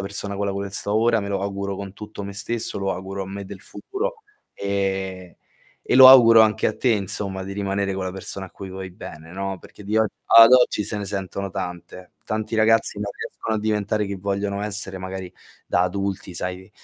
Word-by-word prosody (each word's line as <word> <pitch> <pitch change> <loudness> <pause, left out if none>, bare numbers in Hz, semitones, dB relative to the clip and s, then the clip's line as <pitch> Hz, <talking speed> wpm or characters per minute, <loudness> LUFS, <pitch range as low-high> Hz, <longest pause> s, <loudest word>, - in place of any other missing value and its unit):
persona 100 +1 -3
con 100 0 -1
la 100 - -1
quale 100 0 -4
sto 100 +1 -2
ora, 115 0 +3
me 100 - -5
lo 100 -1 -2
auguro 100 0 -3
con 100 -1 -7
tutto 105 0 -9
me 100 - -6
stesso, 110 +2 -3
lo 95 0 -1
auguro 95 +1 -5
a - - -10
me 100 +1 -6
del 95 0 -10
futuro, 440 - -5 0.3
ehm, 95 -2 -3 0.5
e - - +1
lo 130 -1 +11
auguro 115 -4 +9
anche 110 -1 +3
a - - 0
te, 130 - +1
insomma, 100 -2 -1
di 100 - -6
rimanere 100 0 -1
con 95 - -3
la 95 - -3
persona 95 0 -3
a - - -17
cui 95 -1 -9
vuoi 95 0 -7
bene, 80 -3 -11
no, 95 0 -4
perché 105 - -15
di 105 +2 +1
o 110 - +4 0.3
ad 115 +1 +11
oggi 125 -4 +5
se 105 - -4
ne 105 - -3
sentono 100 0 -4
tante. 90 +1 -7
Tanti 110 0 -3
ragazzi 110 -1 +3
non 100 0 -3
riescono 110 - -5
a - - -1
diventare 105 0 0
chi 100 - -4
vogliono 100 +1 -2
essere 100 -2 -4
magari 95 0 -6 0.3
da 90 - +2
adulti, 95 0 -3
sai, 90 +2 -5
100 Hz, 210 wpm, -23 LUFS, 95-105 Hz, 0.5 s, lo